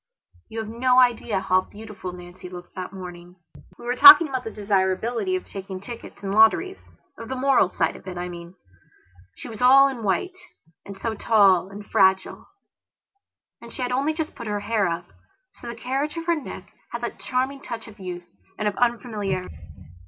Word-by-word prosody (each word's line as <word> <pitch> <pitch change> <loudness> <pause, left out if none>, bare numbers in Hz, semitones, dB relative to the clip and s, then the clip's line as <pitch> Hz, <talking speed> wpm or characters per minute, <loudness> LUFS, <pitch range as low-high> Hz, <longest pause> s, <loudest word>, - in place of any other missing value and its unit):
You 225 - -9
have 220 -1 -3
no 250 +3 +1
idea 235 -5 +2
how 185 -1 +2
beautiful 205 -3 -9
Nancy 180 0 -11
looked 175 -1 -11
that 185 -1 -6
morning. 180 -2 -10 0.4
We - - -12
were 245 +1 -1
talking 375 +2 +10
about 260 -3 -3
the 225 - -5
desirability 210 - -1
of 370 - -4
taking 195 -1 -7
tickets 230 0 -10
in 195 - -3
lotteriesof 220 - +3 0.4
the 230 +3 -6
moral 260 -7 +3
side - - -1
of - - -14
it, 180 -1 -6
I 175 0 -4
mean. 170 0 -10 0.8
She - - -9
was 225 -2 -9
all 270 +2 +7
in 260 -4 -5
white, 225 - -1 0.5
and 200 -1 -9
so 225 +3 -3
tall 200 -4 +3
and 205 +1 -10
fragile; 190 -1 +1 1.1
and 235 - -11
she 255 - -5
had 250 - -2
only 280 +5 0
just 320 -1 -4
put 235 - -8
her 205 -1 -2
hair 215 -1 0
up, 170 0 -3 0.5
so - - -12
that 235 - -5
the - - -16
carriage 275 +6 -2
of 330 - -5
her 340 - +2
neck 305 - -9 0.2
had - - -5
that - - -5
charming 265 +2 -2
touch 230 -2 -7
of 215 -2 -14
youth 180 -2 -7 0.3
and 210 - -1
of 205 - -1
unfamiliarity. 210 - -1
220 Hz, 190 wpm, -24 LUFS, 190-250 Hz, 1.1 s, talking